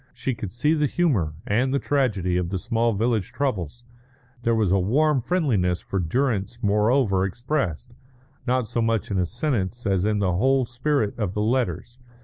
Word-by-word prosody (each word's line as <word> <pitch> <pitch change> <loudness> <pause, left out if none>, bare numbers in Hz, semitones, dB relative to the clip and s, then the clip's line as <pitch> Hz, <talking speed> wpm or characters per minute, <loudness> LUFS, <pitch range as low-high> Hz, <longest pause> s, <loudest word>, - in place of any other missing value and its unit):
She 130 - -2
could 105 -4 -6
see 150 +7 +1
the 150 -2 +2
humour 115 - 0
and 125 +6 +1
the 140 - +2
tragedy 110 -12 0
of 90 -1 0
the 95 - -2
small 115 +3 0
village 110 -1 0
troubles. 120 - -3 0.6
There 115 -1 +1
was 105 -5 +1
a 95 - +4
warm 135 +8 +2
friendliness 115 - +1
for 95 - -3
Durrance 115 - -1
moreover 105 -1 +2
expressed, 120 - -2 0.5
not 125 -2 +1
so 120 +1 -1
much 115 -2 0
in 95 - +1
a 90 - +1
sentence 120 - -2
as 95 -1 +1
in 105 -1 +1
the 95 -3 +1
whole 130 +7 +2
spirit 120 -2 0
of 100 -4 -2
the 105 - 0
letters. 120 +1 -1
115 Hz, 175 wpm, -24 LUFS, 95-130 Hz, 0.6 s, a